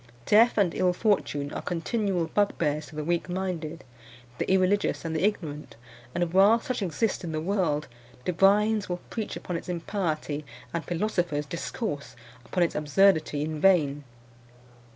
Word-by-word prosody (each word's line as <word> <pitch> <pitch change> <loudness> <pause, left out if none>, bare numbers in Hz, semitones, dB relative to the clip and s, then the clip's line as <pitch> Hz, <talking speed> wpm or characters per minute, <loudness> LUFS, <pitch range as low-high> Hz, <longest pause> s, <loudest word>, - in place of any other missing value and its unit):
Death 225 +3 +5
and 195 -5 +3
ill 180 -1 +2
fortune 175 -8 0
are - - -4
continual 180 0 -1
bugbears 155 -5 0
to - - -13
the 150 - -3
weak 170 +3 -1
minded, 175 -3 -3 0.6
the - - 0
irreligious, 190 0 +2
and 160 -1 -2
the 160 - 0
ignorant; 150 - -2 0.4
and 175 -1 0
while 200 +5 +6
such 250 0 -3
exist 195 +4 -1
in 165 -2 -4
the 155 - -1
world, 165 -4 0 0.4
divines 205 +4 +3
will 180 0 -2
preach 220 -3 -4
upon 175 - -4
its 165 - -9
impiety 165 -4 -2 0.3
and 170 -1 -2
philosophers 175 -5 -1
discourse 150 - -4 0.3
upon 180 +6 0
its 170 - 0
absurdity 155 -1 +3
in 155 -1 -4
vain. 150 -7 +3
175 Hz, 150 wpm, -27 LUFS, 155-200 Hz, 0.6 s, while